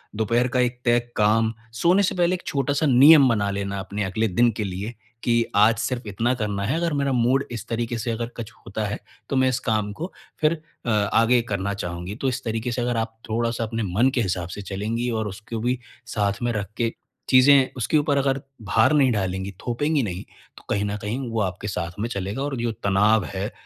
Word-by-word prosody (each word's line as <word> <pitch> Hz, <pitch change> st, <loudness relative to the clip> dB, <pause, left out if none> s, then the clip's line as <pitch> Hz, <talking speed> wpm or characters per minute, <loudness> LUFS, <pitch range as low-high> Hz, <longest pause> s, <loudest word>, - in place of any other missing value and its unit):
दोपहर 115 Hz, +3 st, +1 dB
का 125 Hz, 0 st, 0 dB
एक 125 Hz, 0 st, +1 dB
तय 120 Hz, 0 st, +4 dB, 0.2 s
काम, 110 Hz, +1 st, +3 dB, 0.2 s
सोने 175 Hz, -, +3 dB
से 185 Hz, -, 0 dB
पहले 175 Hz, 0 st, +2 dB
एक 180 Hz, -, -9 dB
छोटा-सा 145 Hz, +2 st, 0 dB
नियम 140 Hz, +2 st, +8 dB
बना 105 Hz, -3 st, +1 dB
लेना 100 Hz, 0 st, -3 dB
अपने 100 Hz, +2 st, -3 dB
अगले 100 Hz, +4 st, 0 dB
दिन 120 Hz, +5 st, +3 dB
के 110 Hz, -, -1 dB
लिए, 100 Hz, +4 st, -4 dB, 0.3 s
कि 115 Hz, -1 st, +2 dB
आज 105 Hz, +3 st, +6 dB
सिर्फ 125 Hz, -3 st, -2 dB
इतना 115 Hz, +5 st, 0 dB
करना 105 Hz, -4 st, -2 dB
है, 130 Hz, -, 0 dB
अगर 170 Hz, -2 st, 0 dB
मेरा 140 Hz, -1 st, 0 dB
मूड 125 Hz, +3 st, +2 dB
इस 115 Hz, -2 st, -6 dB
तरीके 115 Hz, 0 st, -2 dB
से 115 Hz, +1 st, -2 dB
अगर 115 Hz, +1 st, -2 dB
कुछ 115 Hz, 0 st, -6 dB
होता 105 Hz, +2 st, -3 dB
है, 105 Hz, -, -3 dB, 0.3 s
तो 135 Hz, -, -1 dB
मैं 130 Hz, 0 st, +4 dB
इस 125 Hz, -, 0 dB
काम 105 Hz, -2 st, 0 dB
को 170 Hz, -, -6 dB, 0.3 s
फिर 155 Hz, +1 st, +4 dB, 0.3 s
अ, -, -, -1 dB
आगे 115 Hz, +3 st, +3 dB
करना 100 Hz, 0 st, -1 dB
चाहूँगी। 90 Hz, 0 st, -5 dB
तो 135 Hz, -, +1 dB
इस 125 Hz, -, -4 dB
तरीके 115 Hz, +1 st, -2 dB
से 120 Hz, +1 st, -2 dB
अगर 120 Hz, -1 st, 0 dB
आप 115 Hz, 0 st, -3 dB
थोड़ा-सा 115 Hz, +1 st, 0 dB
अपने 115 Hz, 0 st, -2 dB
मन 110 Hz, +9 st, +2 dB
के 120 Hz, -, +2 dB
हिसाब 90 Hz, -3 st, -1 dB
से 100 Hz, -, -6 dB
चलेंगी 110 Hz, +5 st, -2 dB
और 110 Hz, -2 st, -1 dB
उसको 110 Hz, +3 st, -6 dB
भी 125 Hz, +2 st, 0 dB, 0.4 s
साथ 100 Hz, -1 st, 0 dB
में 120 Hz, -, +1 dB
रख 105 Hz, -1 st, -4 dB
के 115 Hz, -1 st, +1 dB, 0.4 s
चीज़ें 130 Hz, +1 st, +6 dB
उसके 125 Hz, +6 st, +1 dB
ऊपर 145 Hz, -1 st, +2 dB
अगर 135 Hz, -1 st, +1 dB, 0.2 s
भार 110 Hz, +7 st, +3 dB
नहीं 135 Hz, -4 st, +4 dB
डालेंगी, 95 Hz, -2 st, -2 dB, 0.2 s
थोपेंगी 145 Hz, +5 st, +1 dB
नहीं 95 Hz, -3 st, -4 dB, 0.3 s
तो -, -, -13 dB
कहीं 100 Hz, 0 st, +1 dB
न 105 Hz, 0 st, -2 dB
कहीं 120 Hz, +5 st, -3 dB
वो 115 Hz, -, -1 dB
आपके 100 Hz, +1 st, -3 dB
साथ 85 Hz, -3 st, -3 dB
में 115 Hz, -, -1 dB
चलेगा 100 Hz, +3 st, -3 dB
और 145 Hz, -1 st, -2 dB
जो 115 Hz, -1 st, -1 dB
तनाव 105 Hz, +1 st, +2 dB
है, 100 Hz, +4 st, -3 dB
115 Hz, 220 wpm, -24 LUFS, 100-125 Hz, 0.4 s, नियम